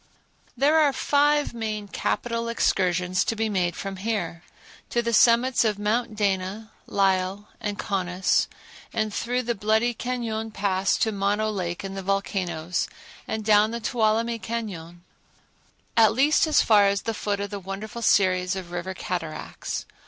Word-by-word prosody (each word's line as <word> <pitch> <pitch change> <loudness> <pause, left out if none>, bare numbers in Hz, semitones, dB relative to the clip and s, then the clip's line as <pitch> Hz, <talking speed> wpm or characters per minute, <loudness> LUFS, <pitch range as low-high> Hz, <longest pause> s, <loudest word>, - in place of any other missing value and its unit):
There 290 +5 +4
are 290 -3 +4
five 290 +2 +2
main 215 -3 -4
capital 230 +3 -2
excursions 185 -5 +1
to 225 - -1
be 220 0 -1
made 180 -4 0
from 195 -1 -5
here—to 200 +3 -4
the 235 0 -1
summits 240 +3 +5
of 215 -3 +1
Mounts 215 +2 -1
Dana, 200 +1 -1 0.2
Lyell 195 +1 0
and 205 -1 -3
Conness, 185 -2 0 0.4
and 215 -2 -1
through 250 +4 -1
the 240 0 0
Bloody 220 +3 +1
Cañon 225 -2 -3
Pass 195 -2 +1
to 225 -3 +1
Mono 205 +2 0
Lake 175 -3 -3
and 195 0 -5
the 195 - -4
volcanoes, 185 -3 -1 0.4
and 220 -1 -3
down 210 0 +5
the 235 +1 -4
Tuolumne 230 0 +1
Cañon, 190 -6 -5 0.9
at 220 -2 +6
least 290 +6 +3
as 310 - +4
far 205 -2 +5
as 200 0 0
the 225 - -2
foot 205 -1 -2
of 200 0 -4
the 205 - -4
wonderful 195 +5 -6
series 185 -3 +3
of 185 -2 -7
river 175 +2 -4
cataracts. 165 -5 -4
210 Hz, 150 wpm, -25 LUFS, 190-230 Hz, 0.9 s, at